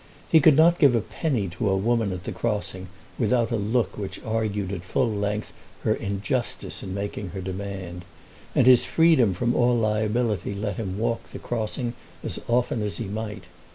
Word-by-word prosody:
He 160 Hz, -, +8 dB
could 155 Hz, -1 st, +6 dB
not 170 Hz, +2 st, +5 dB
give 140 Hz, -6 st, +6 dB
a -, -, +4 dB
penny 125 Hz, -, -1 dB
to 90 Hz, +4 st, -1 dB
a 95 Hz, -, +2 dB
woman 115 Hz, 0 st, +1 dB
at 90 Hz, 0 st, -6 dB
a -, -, -2 dB
crossing 105 Hz, -4 st, -3 dB, 0.3 s
without 115 Hz, 0 st, +2 dB
a -, -, +2 dB
look 105 Hz, -1 st, 0 dB
which 100 Hz, -2 st, -5 dB
argued 105 Hz, -3 st, -1 dB
at 95 Hz, -3 st, -4 dB
full 95 Hz, +6 st, 0 dB
length 105 Hz, 0 st, -2 dB, 0.3 s
her -, -, +3 dB
injustice 105 Hz, +6 st, -2 dB
in 95 Hz, 0 st, -5 dB
making 100 Hz, -1 st, -4 dB
her -, -, -2 dB
demand, 95 Hz, -2 st, -5 dB, 0.5 s
and -, -, +5 dB
his 125 Hz, -1 st, +7 dB
freedom 160 Hz, -, +4 dB
from 120 Hz, +6 st, +1 dB
all 120 Hz, 0 st, +3 dB
liability 110 Hz, -2 st, 0 dB
let 105 Hz, -1 st, -3 dB
him 95 Hz, -4 st, -3 dB
walk 115 Hz, +1 st, -2 dB
the -, -, -8 dB
crossing 120 Hz, +1 st, -3 dB, 0.3 s
as -, -, -3 dB
often 120 Hz, -1 st, +1 dB
as 105 Hz, -1 st, -2 dB
he 115 Hz, -, -3 dB
might. 105 Hz, 0 st, -5 dB
105 Hz, 185 wpm, -25 LUFS, 100-120 Hz, 0.5 s, He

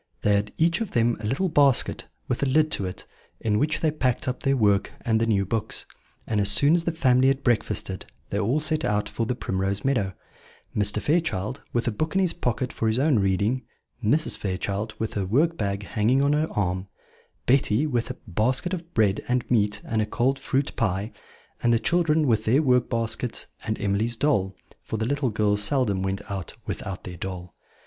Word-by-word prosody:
They 105 Hz, -, +4 dB
had 100 Hz, +1 st, +1 dB
each 170 Hz, +5 st, +2 dB
of 220 Hz, -, -2 dB
them 120 Hz, 0 st, +3 dB
a 105 Hz, -, -4 dB
little 135 Hz, -, 0 dB
basket, 140 Hz, -6 st, +2 dB, 0.2 s
with 125 Hz, -, -1 dB
a 140 Hz, -, +2 dB
lid 155 Hz, +3 st, +3 dB
to 95 Hz, -, +1 dB
it, 90 Hz, -, -8 dB, 0.3 s
in 105 Hz, -2 st, +1 dB
which 155 Hz, +4 st, 0 dB
they 155 Hz, -, +2 dB
packed 130 Hz, -1 st, -1 dB
up 125 Hz, -, -2 dB
their 135 Hz, 0 st, +2 dB
work 100 Hz, -4 st, +2 dB
and 110 Hz, -1 st, +1 dB
the 115 Hz, -, +2 dB
new 100 Hz, -3 st, +2 dB
books; 110 Hz, +2 st, -3 dB, 0.4 s
and, 105 Hz, -2 st, 0 dB
as 100 Hz, -, +5 dB
soon 140 Hz, +8 st, +5 dB
as 170 Hz, -1 st, +2 dB
the 170 Hz, -, +1 dB
family 130 Hz, -5 st, +3 dB
had 135 Hz, +1 st, +1 dB
breakfasted, 105 Hz, -5 st, -1 dB, 0.2 s
they 100 Hz, -, 0 dB
all 115 Hz, +8 st, +1 dB
set 155 Hz, +1 st, +1 dB
out 105 Hz, 0 st, 0 dB
for 115 Hz, -, -3 dB
the 125 Hz, -, -1 dB
Primrose 95 Hz, -1 st, -2 dB
Meadow: 110 Hz, -9 st, +1 dB, 0.6 s
Mr. 105 Hz, 0 st, +2 dB
Fairchild, 130 Hz, -, -1 dB
with 120 Hz, 0 st, -1 dB
a -, -, +2 dB
book 155 Hz, -, -3 dB
in -, -, +4 dB
his 180 Hz, -3 st, +1 dB
pocket 125 Hz, -1 st, -2 dB
for 115 Hz, -, -1 dB
his 110 Hz, +1 st, +1 dB
own 135 Hz, -3 st, +3 dB
reading; 100 Hz, +6 st, +1 dB, 0.4 s
Mrs. 150 Hz, +9 st, +1 dB
Fairchild, 100 Hz, +3 st, -3 dB
with 110 Hz, -, -3 dB
her 100 Hz, -, -1 dB
work 155 Hz, -, +2 dB
bag 100 Hz, -4 st, -2 dB
hanging 115 Hz, +7 st, +1 dB
on 140 Hz, +1 st, +3 dB
her 155 Hz, +1 st, +1 dB
arm; 95 Hz, -1 st, -1 dB, 0.6 s
Betty, 125 Hz, 0 st, +3 dB
with 120 Hz, -6 st, -1 dB
a -, -, -5 dB
basket 125 Hz, -, 0 dB
of 170 Hz, -1 st, -6 dB
bread 105 Hz, -2 st, +2 dB
and 125 Hz, -1 st, 0 dB
meat 105 Hz, -3 st, +1 dB
and 110 Hz, -1 st, 0 dB
a 105 Hz, -, -1 dB
cold 130 Hz, +5 st, 0 dB
fruit 135 Hz, +1 st, -1 dB
pie; 100 Hz, 0 st, -1 dB, 0.5 s
and 120 Hz, -, +3 dB
the 115 Hz, -, +5 dB
children 160 Hz, +4 st, +2 dB
with 110 Hz, -4 st, +1 dB
their 130 Hz, +8 st, +3 dB
work 125 Hz, -3 st, +3 dB
baskets 115 Hz, 0 st, -2 dB, 0.2 s
and 110 Hz, -1 st, -2 dB
Emily's 105 Hz, +4 st, 0 dB
doll, 100 Hz, -10 st, +1 dB, 0.3 s
for 110 Hz, -, -4 dB
the 110 Hz, -, -1 dB
little 140 Hz, +1 st, 0 dB
girls 105 Hz, -1 st, +1 dB
seldom 105 Hz, -4 st, +1 dB
went 95 Hz, +1 st, -2 dB
out 95 Hz, -4 st, -5 dB
without 95 Hz, -3 st, -5 dB
their 90 Hz, -1 st, -8 dB
doll. 90 Hz, -1 st, -6 dB
115 Hz, 205 wpm, -25 LUFS, 105-135 Hz, 0.6 s, as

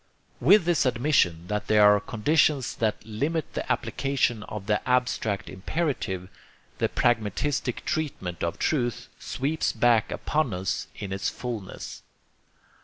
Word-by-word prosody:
With 175 Hz, -, +6 dB
this 170 Hz, -6 st, +3 dB
admission 115 Hz, -, +2 dB
that 105 Hz, 0 st, -2 dB
there 105 Hz, -1 st, +5 dB
are 105 Hz, 0 st, +7 dB
conditions 135 Hz, +6 st, +1 dB
that 110 Hz, -2 st, -1 dB
limit 145 Hz, +9 st, -2 dB
the -, -, -3 dB
application 135 Hz, -5 st, 0 dB
of 105 Hz, -1 st, -7 dB
the 105 Hz, 0 st, +1 dB
abstract 125 Hz, -5 st, +1 dB
imperative, 95 Hz, -, -2 dB, 0.5 s
THE -, -, +1 dB
PRAGMATISTIC 120 Hz, +3 st, 0 dB
TREATMENT 140 Hz, -, -3 dB
OF 85 Hz, 0 st, -1 dB
TRUTH 120 Hz, -7 st, -1 dB
SWEEPS 150 Hz, +5 st, -1 dB
BACK 115 Hz, -1 st, +3 dB
UPON 150 Hz, -8 st, 0 dB
US 95 Hz, 0 st, -2 dB
IN 100 Hz, -2 st, -5 dB
ITS 95 Hz, -, -1 dB
FULNESS. 115 Hz, -6 st, -6 dB
115 Hz, 125 wpm, -26 LUFS, 105-140 Hz, 0.5 s, are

